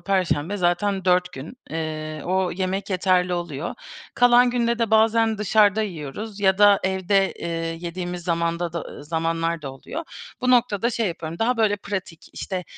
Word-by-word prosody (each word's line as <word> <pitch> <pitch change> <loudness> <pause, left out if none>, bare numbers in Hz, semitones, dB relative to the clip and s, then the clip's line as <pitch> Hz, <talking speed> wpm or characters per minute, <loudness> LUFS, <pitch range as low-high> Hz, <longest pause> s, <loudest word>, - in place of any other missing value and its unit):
perşembe 190 -1 0
zaten 190 +2 0
4 180 0 +2
gün. 155 - -9
Eee, 155 -1 -4
o 185 0 0
yemek 190 +2 -3
yeterli 185 -1 +2
oluyor. 170 -3 -4 0.4
Kalan 245 0 +5
günde 235 -1 0
de 230 -2 0
bazen 220 0 +3
dışarıda 210 0 +3
yiyoruz, 195 +3 -6
ya 190 -1 +3
da 205 -1 +6
evde, 190 +1 +1
eee, - - -7 0.3
yediğimiz 175 0 -5
zamanda 170 0 -1
da 170 -3 -6
zamanlar 165 +1 -1
da 135 - -5
oluyor. 305 - -7 0.4
Bu 255 - +1
noktada 235 -2 +3
şey 230 -2 -1
yapıyorum, 165 -1 -6
daha, 245 +2 +1
böyle, 215 -2 +2
pratik, 190 -5 -6
işte, 185 -2 -4
185 Hz, 155 wpm, -23 LUFS, 170-210 Hz, 0.4 s, da